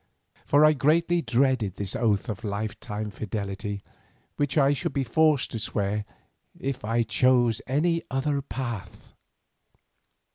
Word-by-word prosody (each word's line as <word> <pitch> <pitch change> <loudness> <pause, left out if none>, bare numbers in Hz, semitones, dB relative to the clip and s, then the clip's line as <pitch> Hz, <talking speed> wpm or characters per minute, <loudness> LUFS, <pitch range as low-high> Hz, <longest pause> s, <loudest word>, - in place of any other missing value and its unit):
For 145 +2 +6
I 155 - +6
greatly 165 +5 +2
dreaded 125 - +1
this 100 -1 -4
oath 110 -4 +1
of 105 -4 -5
life 105 0 -3
long 105 0 -3
fidelity 100 -1 -4 0.5
which 145 +1 -1
I 140 -1 +5
should 135 - -3
be 140 - 0
forced 155 0 +2
to 115 - -4
swear 105 -1 -2 0.5
if 135 -3 -3
I 115 +2 +1
chose 120 +1 +3
any 165 +5 +1
other 140 +2 0
path. 115 -6 -6
120 Hz, 135 wpm, -26 LUFS, 105-140 Hz, 0.5 s, For